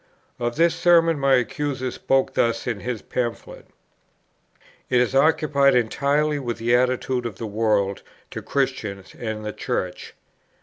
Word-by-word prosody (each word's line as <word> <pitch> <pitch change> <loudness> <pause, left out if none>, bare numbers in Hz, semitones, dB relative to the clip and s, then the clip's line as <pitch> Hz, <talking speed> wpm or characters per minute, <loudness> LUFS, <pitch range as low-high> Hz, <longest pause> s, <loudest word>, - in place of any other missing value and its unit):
Of 120 0 -2
this 165 0 +3
Sermon 165 -2 +3
my 135 -1 +4
accuser 130 0 -2
spoke 135 +2 0
thus 115 0 0
in 115 -4 -2
his 120 0 -4
Pamphlet: 120 -2 -4 1.2
"It 125 - +3
is 125 +1 +1
occupied 140 -1 +3
entirely 145 +5 +1
with 120 -4 -4
the 120 +1 +2
attitude 125 0 0
of 110 - -8
'the 115 - -6
world' 105 -2 0 0.3
to - - -6
'Christians' 105 -9 -3
and 110 -2 -5
'the 105 - -4
Church.' 90 -1 -4
125 Hz, 140 wpm, -23 LUFS, 115-140 Hz, 1.2 s, my